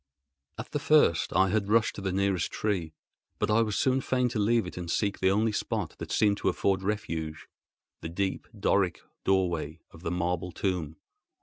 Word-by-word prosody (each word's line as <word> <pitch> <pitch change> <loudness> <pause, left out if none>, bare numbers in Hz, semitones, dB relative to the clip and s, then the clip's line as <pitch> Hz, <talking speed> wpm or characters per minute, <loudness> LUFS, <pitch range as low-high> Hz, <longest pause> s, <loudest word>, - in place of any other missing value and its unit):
At 110 - -7
the 145 - -1
first 145 - +4
I 95 0 +3
had 100 0 0
rushed 110 0 +3
to - - -7
the 95 -1 -1
nearest 95 -2 0
tree; 90 -7 -2 0.4
but - - 0
I 110 +2 +4
was 105 -2 0
soon 130 0 +2
fain 125 -1 +1
to 115 - -2
leave 115 +1 +2
it 90 - -7
and 90 -1 -6
seek 100 +3 0
the 95 - +3
only 110 +3 +2
spot - - -2
that - - -6
seemed 105 -2 +3
to - - +1
afford 95 -1 +1
refuge, 80 -6 -3 0.5
the 80 - -5
deep 95 +3 -2
Doric 95 -3 +1 0.2
doorway 85 -5 0
of 80 - -14
the 85 - -3
marble 90 +1 -1
tomb. 85 -5 -2
95 Hz, 190 wpm, -28 LUFS, 85-105 Hz, 0.5 s, first